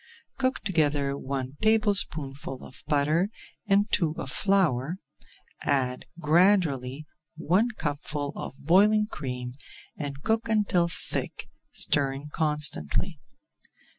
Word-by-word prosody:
Cook 260 0 +1
together 145 -7 +1
one 135 0 -4
tablespoonful 160 - +1
of - - -13
butter 155 +5 +2 0.4
and 200 +1 +4
two 160 -4 +2
of 135 - -4
flour, 175 -5 +2 0.6
add 125 -2 0
gradually 155 -5 +2 0.3
one 185 +9 +2
cupful 145 0 -2
of - - -6
boiling 205 +8 +4
cream, 125 - -5 0.4
and 145 -1 -6
cook 225 +1 0
until 200 -5 +2
thick, 170 - -4 0.2
stirring 140 0 +1
constantly. 150 - 0
150 Hz, 100 wpm, -27 LUFS, 140-195 Hz, 0.6 s, and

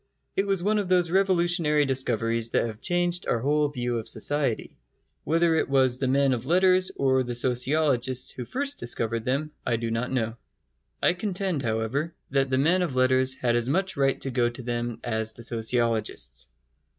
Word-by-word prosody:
It 195 - 0
was 195 -3 0
one 210 +2 +2
of 195 -3 -3
those 180 -2 +2
revolutionary 175 -5 +2
discoveries 115 -3 -1
that - - +1
have 110 -1 -7
changed 175 0 0
our - - +1
whole 145 +5 +1
view 120 -4 -2
of 110 - -8
society. 145 -4 -1 0.5
Whether 165 +1 +2
it 160 - 0
was 130 -2 +2
the 135 - 0
men 135 0 +3
of 125 +1 -4
letters 185 +2 +4
or 130 -1 +2
the 120 -1 -4
sociologists 130 0 +1
who 125 - -7
first 280 - -2
discovered 115 -1 -1
them 140 +4 -1
I 120 - 0
do 115 0 -3
not 115 +3 -2
know. 115 -3 -2 0.7
I - - +4
contend, 185 -4 -2
however, 120 +7 -2 0.2
that 135 -1 +1
the 130 - +1
men 165 +7 +3
of 165 -8 -2
letters 130 +1 +3
had 120 -2 0
as 120 +1 0
much 190 +5 0
right 135 -1 +1
to 135 - -2
go 120 -1 +1
to 120 +1 -8
them 120 -1 -3
as 110 -2 -2
the 115 - -11
sociologists. 115 - -1
130 Hz, 185 wpm, -26 LUFS, 120-165 Hz, 0.7 s, letters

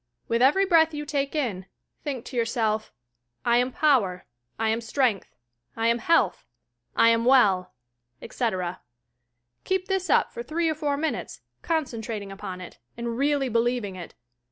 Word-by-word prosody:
"With 230 +1 +1
every 295 +10 +5
breath 325 -4 +4
you 295 0 -4
take 280 0 -2
in, 205 -11 -2 0.4
think 270 -6 -4
to - - -9
yourself, 225 -2 0 0.5
"I 235 0 +4
am 250 +1 +1
power; 245 - +2 0.3
I 225 0 0
am 225 +1 0
strength; 230 -3 0 0.4
I 225 +1 +2
am 235 +1 +2
health; 330 +9 +2 0.5
I 230 - +6
am 230 0 +3
well!" 205 - +4 0.4
etc. 185 -7 -3 0.8
Keep 375 0 -1
this 385 -1 -1
up - - +3
for 475 - -5
three 335 -6 -1
or - - +1
four 295 -2 -1
minutes, 320 +2 -3 0.2
concentrating 230 -10 -3
upon 190 -2 -7
it, 175 -11 -11 0.2
and 235 -1 -3
really 280 +1 +1
be 230 -1 +2
lieving 235 -5 -1
it. 175 -2 -9
240 Hz, 155 wpm, -26 LUFS, 220-295 Hz, 0.8 s, I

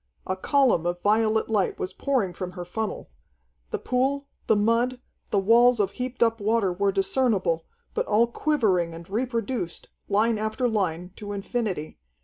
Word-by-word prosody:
A 185 - -1
column 235 - +2
of 175 0 -2
violet 220 +1 +2
light 210 -4 0
was 185 - -4
pouring 245 -10 0
from 180 0 -6
her 175 -1 -6
funnel. 220 +5 -4 0.6
The - - -2
pool, 270 +3 0 0.2
the 220 - +5
mud, 230 +4 +2 0.3
the - - +1
walls 235 +4 +5
of 200 -2 +1
heaped 250 +2 -1
up 225 -1 +1
water 210 -3 +2
were 200 +2 +1
discernible, 195 -4 +1 0.3
but - - -1
all 215 +3 +4
quivering 215 - +1
and 170 +1 -10
reproduced, 230 -3 -2 0.2
line 215 +2 +2
after 220 +4 0
line, 180 -5 -1
to 205 -1 -6
infinity. 200 - -3
215 Hz, 155 wpm, -26 LUFS, 185-235 Hz, 0.6 s, the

